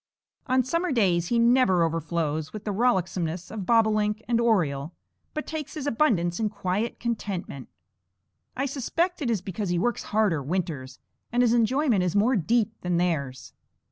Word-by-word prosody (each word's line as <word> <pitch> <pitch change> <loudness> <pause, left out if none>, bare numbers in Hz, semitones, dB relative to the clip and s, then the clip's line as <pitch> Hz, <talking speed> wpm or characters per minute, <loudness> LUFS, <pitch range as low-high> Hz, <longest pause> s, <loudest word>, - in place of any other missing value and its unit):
On 255 0 +3
summer 335 +7 -1
days 180 -9 +2
he 235 - +1
never 235 -7 +4
overflows 160 -1 -2
with 215 -1 -7
the 210 - -2
rollicksomeness 185 -6 0
of 205 -4 -5
bobolink 215 -2 +2
and 235 0 +2
oriole, 160 -10 +1 0.4
but 305 - -3
takes 310 -2 -6
his 300 -3 -4
abundance 215 - +1
in 220 -1 +1
quiet 200 +2 -2
contentment. 200 - -4 0.9
I 270 - 0
suspect 330 +7 -1
it 260 - -1
is 220 -5 0
because 195 +1 -4
he 175 - +1
works 240 +7 -1
harder 205 -8 +1
winters, 145 -4 -3 0.3
and 245 +1 +3
his 235 -1 +3
enjoyment 240 -1 +2
is 180 0 -1
more 225 +6 +3
deep 225 +4 +1
than 180 -1 0
theirs. 140 -8 -2
210 Hz, 160 wpm, -26 LUFS, 170-240 Hz, 0.9 s, never